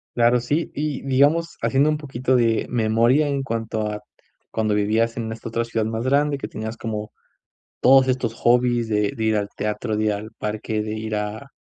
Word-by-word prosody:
Claro, 120 +1 +4
sí. 145 +7 -1
Y, 150 -2 -3
digamos, 145 +5 +2
haciendo 140 +3 +3
un 155 - +1
poquito 130 -3 -1
de 115 -2 +2
memoria 120 +5 +3
en 140 -1 -1
cuanto 115 -3 -2
a 105 0 -6 0.5
cuando 110 -1 0
vivías 110 +3 +1
en 110 -1 -3
esta 115 0 -7
otra 115 +1 -1
ciudad 115 -1 -2
más 110 +1 -2
grande, 140 +2 +2
que - - -4
tenías 110 +1 -6
como 105 -2 -4 0.7
todos 130 +1 +6
estos 125 -3 0
hobbies 120 0 +2
de 105 -1 +1
de 110 - -3
ir 110 0 +2
al 100 -1 -1
teatro, 105 +1 -2
de 110 - 0
ir 105 - +2
al 105 +2 -6
parque, 105 0 -3
de 105 0 -4
ir 110 0 -3
a 105 +5 -4
115 Hz, 195 wpm, -22 LUFS, 110-130 Hz, 0.7 s, todos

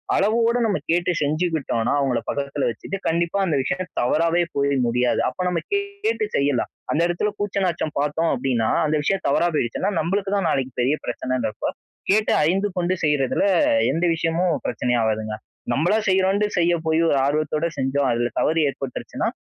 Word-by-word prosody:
அளவோடு 230 +3 +2
நம்ம 205 -3 +1
கேட்டு 175 +2 +2
செஞ்சுக்கிட்டோனா, 155 -6 0
அவங்கள 130 -4 +1
பக்கத்தில 140 0 -2
வச்சுட்டு, 195 +11 -5
கண்டிப்பா 170 +3 0
அந்த 165 -5 0
விஷயம் 180 +8 -3
தவறாவே 165 +7 +2
போய் 140 0 +1
முடியாது. 125 +1 +1
அப்போ - - -7
நம்ம 175 -2 0
கேட்டு 400 +2 -1
செய்யலாம், 140 -3 +1 0.2
அந்த 155 - +1
இடத்துல 175 +4 -1
கூச்ச 205 -1 -2
நாச்சம் 170 -3 -2
பார்த்தோம் 150 +3 0
அப்படின்னா, 125 -3 0 0.2
அந்த 155 - +1
விஷயம் 190 +6 0
தவறா 160 +5 +3
போயிடுச்சுன்னா, 150 - 0
நம்பளுக்கு 195 +4 -1
தான் 195 -4 +1
நாளைக்கு 130 -1 -1
பெரிய 130 +5 +2
பிரச்சனைன்னு 130 -1 -2
இருக்கும், 105 - -4 0.4
கேட்டு 215 +1 +3
அறிந்து 190 +6 +1
கொண்டு 180 +1 +1
செய்றதில 145 -4 +1 0.5
எந்த 165 +5 0
விஷயமும் 165 +2 0
பிரச்சனை 120 +1 -1
ஆவாதுங்க, 110 -1 -1 0.4
நம்பளா 175 +9 +2
செய்றோன்ட்டு 190 +2 +2
செய்ய 175 0 +3
போய், 160 +1 +3
ஒரு - - +2
ஆர்வத்தோடு 155 +2 0
செஞ்சோம் 135 0 0
அதில 120 0 0
தவறு 160 +1 +2
ஏற்பட்டுருச்சுன்னா, 135 -2 -4
160 Hz, 155 wpm, -22 LUFS, 135-185 Hz, 0.5 s, தவறா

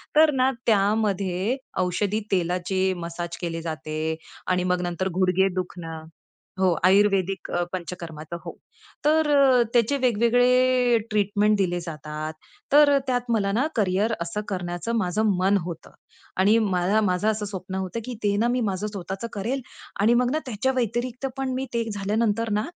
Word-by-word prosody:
तर 310 0 +6
ना 260 0 +3
त्यामध्ये 200 0 +1 0.2
औषधी 195 +3 0
तेलाचे 185 +1 0
मसाज 170 0 -5
केले 165 -1 -3
जाते 155 -1 -5 0.5
आणि 180 -1 +1
मग 180 0 +1
नंतर 175 +1 -2
गुडघे 185 +1 +3
दुखणं 170 -3 -5 0.6
हो, 185 -2 +4
आयुर्वेदिक 195 -1 +3
अ, 175 - 0
पंचकर्माचं. 170 -3 -6
हो. - - -7 0.5
तर 310 0 +3
अ, 270 -3 +5
त्याचे 240 +4 +3
वेगवेगळे 245 +1 +3
ट्रीटमेंट 210 0 +2
दिले 175 -3 0
जातात. 155 -1 -6 0.4
तर 290 -1 +7
त्यात 245 -1 -1
मला 200 -3 +1
ना 235 +8 +1
करियर 205 +1 +1
असं 170 +5 -3
करण्याचं 180 +4 -3
माझं 215 +2 +1
मन 195 +2 +3
होतं 170 -2 -8 0.5
आणि 200 +4 +4 0.2
मला 185 +4 +2
माझं 180 +4 0
असं 210 -1 -3
स्वप्न 190 -2 -6
होतं, 190 +4 -3
की 255 - -5
ते 200 -1 +2
ना 225 +3 +2
मी 245 +1 0
माझं 195 +2 -3
स्वतःचं 195 +1 -5
करेल 235 +7 -2 0.4
आणि 220 +3 +5
मग 250 0 0
ना 310 - +1
त्याच्या 245 +2 0
व्यतिरिक्त 245 +2 -1
पण 265 -1 -2
मी 260 +1 -2
ते 235 0 +1
झाल्यानंतर 210 +2 0
ना, 210 +2 0
200 Hz, 155 wpm, -24 LUFS, 180-235 Hz, 0.6 s, तर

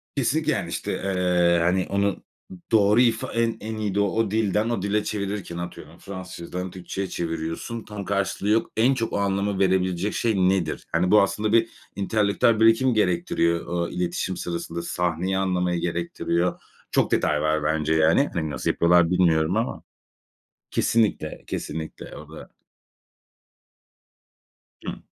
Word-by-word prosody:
Kesinlikle, - - +1
yani, - - -2
işte, - - -3
eee, 90 -2 +2
hani, 90 +2 +1
onu, 100 0 0 0.5
doğru 105 +1 +5
ifa 115 -2 +1
en 115 0 0
en 110 +1 -5
iyi 105 -3 -2
de 100 - +2
o 100 +1 +1
dilden 110 0 +1
o 120 -5 -1
dile 105 +2 0
çevirirken 100 -4 -4
atıyorum 85 -2 -8
Fransızcadan 90 -1 -7
Türkçeye 95 +1 -5
çeviriyorsun, 80 +7 -4
tam 105 -2 -7
karşılığı 100 +1 -1
yok. 110 +1 +2
"En 120 +5 +4
çok 115 -4 -3
o - - 0
anlamı 100 0 0
verebilecek 95 0 +1
şey 115 -3 0
nedir?" 95 -3 +1
Hani, 90 +3 +1
bu 105 - +7
aslında 105 +2 0
bir 115 0 +4 0.3
entelektüel 105 +2 +2
birikim 115 +3 +4
gerektiriyor, 85 -4 +1
ooo, 85 0 -2
iletişim 90 +1 -2
sırasında, 85 -1 -4
sahneyi 90 +2 -1
anlamayı 90 -2 0
gerektiriyor. 85 0 -1 0.3
Çok - - +2
detay 75 0 +2
var 75 0 +1
bence, 80 +1 +1
yani. 80 - +3
Hani, 80 -3 -2
nasıl - - -2
yapıyorlar 85 0 +4
bilmiyorum 85 0 +3
ama. 115 +2 -2 0.9
Kesinlikle, 105 -9 0
kesinlikle 80 - -6
o - - -11
da - - -10 2.4
Hı. - - -6
95 Hz, 140 wpm, -24 LUFS, 85-105 Hz, 2.4 s, bu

